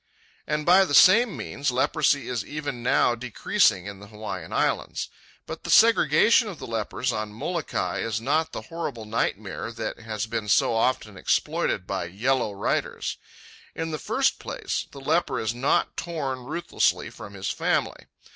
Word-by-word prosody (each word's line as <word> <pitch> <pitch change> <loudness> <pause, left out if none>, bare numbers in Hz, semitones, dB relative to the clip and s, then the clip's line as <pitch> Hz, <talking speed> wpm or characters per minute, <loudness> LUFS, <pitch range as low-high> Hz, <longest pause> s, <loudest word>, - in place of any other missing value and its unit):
And 150 0 -1
by 185 +3 +7
the 145 -7 0
same 215 - +6
means 140 - -2
leprosy 140 +2 +1
is 120 -4 -2
even 145 -5 -5
now 120 0 +3
decreasing 115 -6 +1
in 100 -1 -7
the 100 - -12
Hawaiian 110 0 -7
Islands. - - -1 0.4
But - - -7
the - - -7
segregation 230 0 +5
of 195 -6 -6
the - - -8
lepers 115 +2 -2
on 110 -2 -3
Molokai 160 +9 -3
is 110 -1 -1
not 150 +7 0
the - - -6
horrible 145 -9 -5
nightmare 110 +2 -2
that - - -5
has 110 -1 -4
been 110 -1 -4
so 100 +3 +3
often 115 -3 0
exploited - - 0
by - - -3
yellow 115 +6 0
writers. 100 0 -2 0.6
In 165 0 -3
the 155 - -3
first - - +1
place, - - -4
the 140 - -11
leper 150 -2 +1
is 110 0 -1
not 130 +4 +1
torn 135 -7 -4
ruthlessly 165 +6 0
from 100 0 -10
his 95 0 -3
family. - - -1
125 Hz, 160 wpm, -25 LUFS, 110-155 Hz, 0.6 s, by